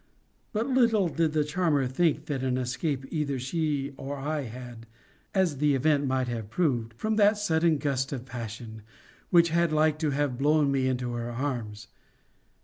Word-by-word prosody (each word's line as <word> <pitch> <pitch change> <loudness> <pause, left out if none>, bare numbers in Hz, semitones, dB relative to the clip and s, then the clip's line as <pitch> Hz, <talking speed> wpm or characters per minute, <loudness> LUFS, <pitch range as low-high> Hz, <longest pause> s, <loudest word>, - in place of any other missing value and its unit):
But 220 +2 -1
little 230 -8 +3
did 160 -1 0
the 155 -1 +2
charmer 150 -3 +1
think 150 +3 +1
that 145 -4 -3
an 130 -1 0
escape 130 +2 -2
either 145 -4 -1
she 140 +1 -2
or 140 +1 -5
I 145 +1 -2
had 120 -1 -9 0.5
(as 180 -7 +2
the 145 -1 +3
event 145 +1 +2
might 130 -1 0
have 115 -3 -4
proved) 120 -7 0
from 215 - -1
that 210 0 +5
sudden 165 -5 +2
gust 140 -2 -1
of 130 -3 -5
passion, 115 -2 -7 0.5
which 170 -1 +5
had 170 0 +2
like 155 0 +2
to 155 -2 0
have 140 -3 -1
blown 150 0 +3
me 135 -1 +1
into 125 -1 -1
her 120 0 -3
arms. 120 -5 -4
140 Hz, 170 wpm, -28 LUFS, 125-160 Hz, 0.5 s, that